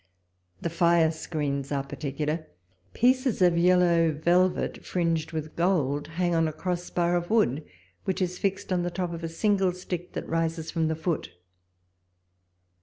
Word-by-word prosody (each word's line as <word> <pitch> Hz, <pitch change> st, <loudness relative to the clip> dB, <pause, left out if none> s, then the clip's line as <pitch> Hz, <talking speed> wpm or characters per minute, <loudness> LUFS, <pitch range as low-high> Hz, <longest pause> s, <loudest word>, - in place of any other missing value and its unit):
The 170 Hz, -, -2 dB
fire 170 Hz, -1 st, +4 dB
screens 145 Hz, -4 st, -3 dB
are 140 Hz, -1 st, 0 dB
particular; 150 Hz, +3 st, -3 dB, 0.5 s
pieces 255 Hz, 0 st, +2 dB
of 180 Hz, -2 st, +4 dB
yellow 170 Hz, -1 st, +4 dB
velvet, 175 Hz, +4 st, +1 dB
fringed 165 Hz, -3 st, -1 dB
with 155 Hz, -1 st, -5 dB
gold, 150 Hz, -6 st, +1 dB
hang 175 Hz, +2 st, -1 dB
on 165 Hz, -1 st, +3 dB
a -, -, -2 dB
cross 175 Hz, +3 st, -3 dB
bar 175 Hz, 0 st, +1 dB
of 175 Hz, 0 st, -1 dB
wood, 160 Hz, -, +2 dB, 0.4 s
which 190 Hz, -, -1 dB
is 180 Hz, -1 st, -2 dB
fixed 195 Hz, -1 st, -1 dB
on 180 Hz, -, +1 dB
the 175 Hz, -, -1 dB
top 175 Hz, -1 st, -3 dB
of 165 Hz, 0 st, -7 dB
a 165 Hz, -, -2 dB
single 195 Hz, +1 st, +1 dB
stick, 180 Hz, -1 st, -6 dB
that -, -, -5 dB
rises 165 Hz, 0 st, -1 dB
from 165 Hz, -2 st, 0 dB
the 160 Hz, -, 0 dB
foot. 160 Hz, +1 st, -2 dB
170 Hz, 160 wpm, -27 LUFS, 160-180 Hz, 0.5 s, fire